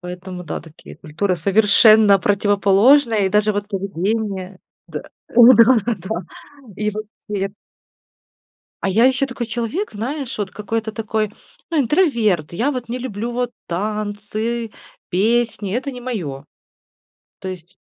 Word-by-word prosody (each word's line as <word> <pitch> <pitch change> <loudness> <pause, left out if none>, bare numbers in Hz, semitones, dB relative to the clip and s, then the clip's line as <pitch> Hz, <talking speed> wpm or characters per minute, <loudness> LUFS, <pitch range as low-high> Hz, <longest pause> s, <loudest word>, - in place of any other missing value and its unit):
Поэтому, 180 0 -8
да, - - -5
такие 160 -2 -14
культуры 175 +5 -2
совершенно 210 +1 +5
противоположные, 205 +4 +3
и - - +2
даже 210 +2 +2
вот 205 0 -3
поведение. 195 0 -3 0.3
Да, - - -6 0.3
да, 240 +1 +7 0.2
да, 185 0 -11 0.7
и 210 0 -1
вот 215 +1 -5 0.2
тет 195 -1 -2 1.3
А 195 - +1
я 220 +6 +4
ещё 260 +1 +2
такой 255 -3 -5
человек, 240 - -3
знаешь, 255 +5 -4
вот 200 -3 -3
какой-то 220 +2 -3
такой, 215 -1 -2 0.4
ну, 325 - +2
интроверт. 235 - +1
Я 240 +11 0
вот 250 -4 -5
не 250 +2 -3
люблю 235 -2 -4
вот 245 0 -2 0.2
танцы, 215 +4 -3 0.4
песни. 215 0 0
Это 275 +2 -2
не 250 - -8
мое. 165 - -5 0.9
То 190 - -7
есть, 185 0 -9
215 Hz, 130 wpm, -20 LUFS, 195-235 Hz, 1.3 s, да